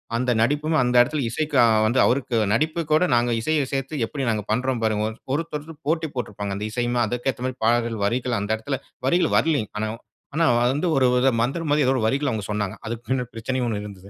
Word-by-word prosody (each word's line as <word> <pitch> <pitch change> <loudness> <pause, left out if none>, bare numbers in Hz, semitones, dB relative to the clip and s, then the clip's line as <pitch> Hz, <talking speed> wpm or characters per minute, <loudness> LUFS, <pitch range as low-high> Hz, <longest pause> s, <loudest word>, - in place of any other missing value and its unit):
அந்த 125 +1 +1
நடிப்பும் 150 +6 +1
அந்த 125 0 0
எடத்துல 145 +4 0
இசைக்கு 150 +5 -3
அ - - +6 0.2
வந்து 120 +4 +2
அவருக்கு 125 -1 0 0.2
நடிப்பு 155 +7 +1
கூட 155 - +4
நாங்க 120 0 +2
இசையை 155 +4 +1
சேர்த்து 135 +1 -2
எப்படி 135 +3 -5
நாங்க 110 -2 -1
பண்றோம் 125 +1 0
பாருங்க. 110 -1 +1 0.3
ஒருத்தரு 160 0 -4
போட்டி 160 -1 0
போட்டுப்பாங்க. 105 -5 -4
அந்த 105 - -4
இசையுமே 120 +1 -1
அதுக்கு 120 +4 -1
ஏத்த 125 +3 -6
மாரி 130 0 -3
பாடல்கள், 115 -1 +1
வரிகள் 120 +2 0
அந்த 100 +1 -4
இடத்துல 135 +4 -4 0.3
வரிகள் 175 +4 +2
வரலங்க. 145 -10 +1
ஆனா 110 0 -1 0.5
ஆனா 165 0 +3 0.3
வந்து 150 +5 -1
ஒரு 130 -1 +4 0.4
மந்திரம் 150 +5 -2
மாதிரி 145 -2 +3
ஏதோ 135 - +4
ஒரு 110 - 0
வரிகள் 140 +2 0
அவங்க 105 -3 -3
சொன்னாங்க. 105 -2 -2
அதுக்கு 115 +1 -5
பின்ன 130 -1 0
பிரச்சனையும் 125 +2 -2
ஒண்ணு 105 -1 -3
இருந்தது. 100 -1 -11
125 Hz, 200 wpm, -23 LUFS, 110-145 Hz, 0.5 s, அ